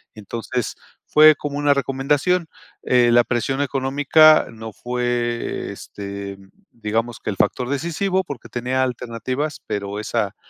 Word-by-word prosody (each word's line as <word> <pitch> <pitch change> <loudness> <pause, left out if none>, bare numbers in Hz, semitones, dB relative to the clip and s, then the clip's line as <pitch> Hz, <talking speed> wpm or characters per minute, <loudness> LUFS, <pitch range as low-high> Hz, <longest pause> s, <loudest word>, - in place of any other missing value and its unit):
entonces, 115 +3 -4 0.4
fue 155 +1 +8
como 145 0 -5
una 145 0 +3
recomendación, 145 +6 0 0.4
eh, 120 -1 +4
la 120 0 +6
presión 135 +4 -1
económica 145 +3 +4
no 110 -1 -9
fue, 120 -1 -2
este, 100 -1 -7 0.3
digamos 115 +1 -2
que - - -3
el - - -5
factor 125 +4 +1
decisivo, 170 +6 0
porque 145 -8 -8
tenía 125 +2 -1
alternativas, 125 +4 -3
pero 100 -1 -4
esa 105 -2 -2
125 Hz, 125 wpm, -21 LUFS, 115-145 Hz, 0.4 s, fue